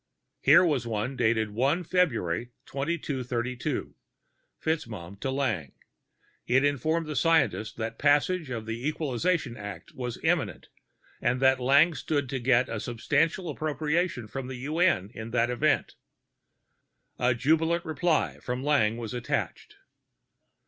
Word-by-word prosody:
Here 180 - +6
was 140 -8 0
one 115 +4 -2
dated 110 -3 +1
1 135 - +1
Feb 120 - 0 0.2
2232, 130 -5 -3 0.7
FitzMaugham 105 - -3
to 135 - -2
Lang: 120 - -1 0.7
it 135 +3 +4
informed 155 +4 +1
the 150 -1 -5
scientist 145 -7 +2
that 115 0 -4
passage 145 +3 +2
of 115 -3 -4
the 115 +4 -3
Equalization 155 -2 -1
Act 105 -2 -8
was 125 -2 -4
imminent, - - 0 0.5
and 120 +1 +1
that 130 0 +4
Lang 140 +7 +5
stood 145 -4 -2
to 135 -1 -2
get 125 0 +3
a 115 - -4
substantial 145 - 0
appropriation 155 -3 -1
from 135 +3 -5
the 130 - -5
UN 155 - +2
in 110 +1 -7
that 120 +1 +1
event. 145 +5 +1 1.3
A 125 0 +2
jubilant 160 +7 +2
reply 160 +1 0
from 125 +1 -4
Lang 130 -7 +2
was 115 -1 -5
attached. 120 -1 -3
130 Hz, 130 wpm, -28 LUFS, 115-155 Hz, 1.3 s, Here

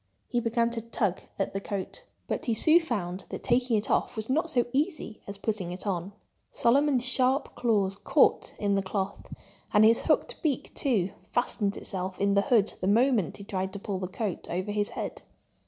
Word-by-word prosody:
He 240 - +1
began 235 0 +1
to 230 -1 -2
tug 210 -4 -1 0.2
at 195 - -2
the 195 - -3
coat. 200 - -5 0.2
But - - -3
he 230 - +2
soon 315 +9 +6
found 195 - -3
that - - -6
taking 245 -2 +2
it 205 - -2
off - - +1
was 220 +2 -2
not 320 +5 +1
so 250 -6 +2
easy 295 - -2
as 200 0 -5
putting 200 -4 -2
it 180 +3 -7
on. 190 0 -2 0.4
Solomon's 265 +1 +3
sharp 260 +1 +2
claws 205 -5 +1
caught - - +2
in 205 -1 0
the 195 - +2
cloth; 195 +1 -4 0.4
and 210 0 +6
his 230 +1 +5
hooked - - +1
beak, 290 -6 -1
too, 205 -9 +1 0.2
fastened 210 -4 0
itself 185 -1 -4
in 200 0 +2
the 200 - +4
hood 215 -1 +2
the 185 - -1
moment 225 - +2
he 200 - -9
tried 190 -1 -3
to 200 - -4
pull 195 -1 -4
the 185 - -3
coat 195 0 -4
over 185 +4 -2
his 205 0 0
head. - - -4
210 Hz, 195 wpm, -28 LUFS, 195-245 Hz, 0.4 s, soon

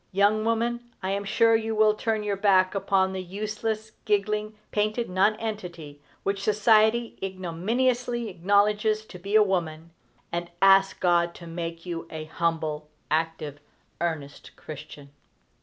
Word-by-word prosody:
Young 205 +3 +3
woman, 235 +1 -1
I 190 - -1
am 200 +1 -1
sure 225 +3 +4
you 225 0 -1
will 215 0 +5
turn 220 0 -1
your 205 -1 -1
back 190 -2 +3
upon 190 -1 +1
the 190 - -3
useless, 215 +3 -4
giggling, 210 +1 0
painted 215 +1 0
nonentity 185 -7 -1 0.2
which 195 0 -1
society 220 +2 +3
ignominiously 230 +7 -1
acknowledges 205 +3 +2
to 180 - -11
be 200 +4 -3
a 215 - +8
woman, 165 -4 -2 0.4
and 170 0 -3
ask 195 0 +5
God 175 -1 +2
to 170 - -11
make 165 0 -6
you 170 -2 -5
an 155 -1 -6
humble, 155 -2 -2 0.2
active, 155 -2 -1 0.4
earnest 155 -4 -4
Christian. 145 -1 -10
195 Hz, 135 wpm, -26 LUFS, 170-215 Hz, 0.4 s, a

